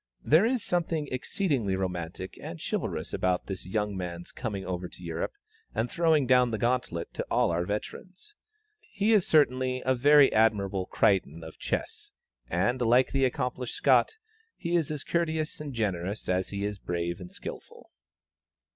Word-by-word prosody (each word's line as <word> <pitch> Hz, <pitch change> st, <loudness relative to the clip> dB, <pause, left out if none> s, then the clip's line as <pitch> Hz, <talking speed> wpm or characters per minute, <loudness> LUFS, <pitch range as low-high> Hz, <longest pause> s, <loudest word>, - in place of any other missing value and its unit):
There 165 Hz, +9 st, +5 dB
is 250 Hz, -2 st, 0 dB
something 165 Hz, -4 st, 0 dB
exceedingly 130 Hz, -, -1 dB
romantic 90 Hz, -1 st, -4 dB
and -, -, -7 dB
chivalrous -, -, -3 dB
about 90 Hz, -1 st, 0 dB
this 95 Hz, -2 st, -5 dB
young 105 Hz, +1 st, -1 dB
man's 90 Hz, -2 st, -6 dB
coming 100 Hz, -5 st, -4 dB
over 90 Hz, -1 st, -3 dB
to 90 Hz, -, -13 dB
Europe 85 Hz, -1 st, -3 dB, 0.4 s
and 115 Hz, +1 st, -1 dB
throwing 160 Hz, -4 st, +3 dB
down 125 Hz, -1 st, +4 dB
the 110 Hz, -, -2 dB
gauntlet 120 Hz, -7 st, -1 dB
to -, -, -3 dB
all -, -, +2 dB
our 85 Hz, +1 st, -1 dB
veterans. 185 Hz, -, -6 dB, 0.4 s
He 220 Hz, -, -1 dB
is 205 Hz, -5 st, +4 dB
certainly 130 Hz, -4 st, +2 dB
a 130 Hz, -, +3 dB
very 145 Hz, +2 st, +6 dB
admirable 100 Hz, -4 st, +2 dB
Crichton 85 Hz, -5 st, +1 dB
of 80 Hz, -, -11 dB
Chess, -, -, -4 dB, 0.4 s
and, 120 Hz, +9 st, +1 dB
like 120 Hz, +2 st, +4 dB
the 135 Hz, -1 st, +2 dB
accomplished 125 Hz, -1 st, -2 dB
Scot, 445 Hz, -, +3 dB, 0.4 s
he 170 Hz, +1 st, -1 dB
is 165 Hz, -4 st, +1 dB
as 150 Hz, -2 st, -4 dB
courteous 160 Hz, -3 st, -1 dB
and 150 Hz, -2 st, -5 dB
generous 100 Hz, -4 st, -2 dB
as 90 Hz, 0 st, 0 dB
he 100 Hz, 0 st, -3 dB
is 105 Hz, -1 st, -4 dB
brave 85 Hz, -1 st, -3 dB
and 90 Hz, -1 st, -9 dB
skilful. -, -, -9 dB
115 Hz, 160 wpm, -28 LUFS, 95-145 Hz, 0.4 s, very